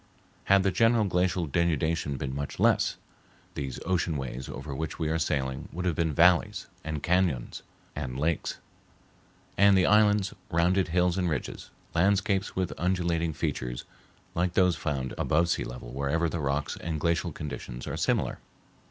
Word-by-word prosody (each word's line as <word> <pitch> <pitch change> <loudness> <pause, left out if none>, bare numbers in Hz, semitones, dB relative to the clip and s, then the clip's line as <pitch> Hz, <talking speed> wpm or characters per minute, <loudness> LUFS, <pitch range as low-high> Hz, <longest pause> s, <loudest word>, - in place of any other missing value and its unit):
Had 100 0 +5
the 95 - +2
general 115 +3 +3
glacial 90 -1 +1
denudation 80 -2 0
been 65 0 -4
much 70 +1 -5
less, - - +3 0.6
these 70 -2 -4
ocean 85 -4 0
ways 65 -1 -5
over 75 - -6
which 80 +3 -4
we 80 -2 -1
are 80 +1 0
sailing 65 -4 -2
would 90 +2 -4
have 90 - +2
been 80 +1 0
valleys 90 +5 +3 0.2
and 80 -2 -4
cañons 85 -8 +1 0.3
and 65 -4 -4
lakes; 80 +2 -1 1.0
and 100 -1 +7
the 90 - +4
islands 105 -2 +4 0.2
rounded 90 +3 +2
hills 90 +1 +2
and 90 -2 +1
ridges, 75 -5 -4 0.2
landscapes 100 +2 +1
with 95 -2 -1
undulating 85 -2 0
features 60 -4 -3 0.5
like 90 +1 0
those 90 -2 +4
found 70 -2 -3
above 80 +2 +2
sea - - +1
level - - -8
wherever 70 +6 0
the 85 +1 -3
rocks 70 +1 -1
and 80 -2 -3
glacial 85 +2 0
conditions 70 -5 -6
are - - -4
similar. - - 0
85 Hz, 155 wpm, -28 LUFS, 70-90 Hz, 1.0 s, and